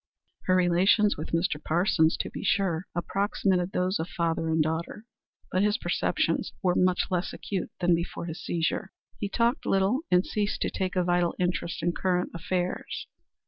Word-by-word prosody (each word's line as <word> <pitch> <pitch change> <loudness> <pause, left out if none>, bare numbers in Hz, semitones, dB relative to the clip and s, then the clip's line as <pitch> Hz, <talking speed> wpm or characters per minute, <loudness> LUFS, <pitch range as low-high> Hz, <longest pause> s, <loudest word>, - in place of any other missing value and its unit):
Her 185 - +3
relations 185 +4 +4
with 155 - -6
Mr. 165 -3 0
Parsons, 165 -1 +2
to - - -6
be - - -6
sure, 185 -3 +1
approximated 190 0 0
those 185 +1 0
of 160 - -2
father 165 -1 -1
and 160 0 +1
daughter, 160 +7 -1 0.5
but 185 - +2
his 210 0 +2
perceptions - - 0
were 180 -1 +3
much 180 0 +2
less 180 -1 -1
acute 190 -3 -4
than 175 0 +4
before 170 0 -2
his 165 -1 -6
seizure; 170 +4 -1 0.3
he 205 - -2
talked 235 +6 +1
little 195 +6 +2
and 180 +1 +4
ceased 210 -1 -1
to - - 0
take 185 -1 -2
a 180 - +2
vital 175 -1 +1
interest 175 -2 -1
in 175 - +2
current 180 0 0
affairs. 180 +1 -3
180 Hz, 170 wpm, -27 LUFS, 170-190 Hz, 0.5 s, relations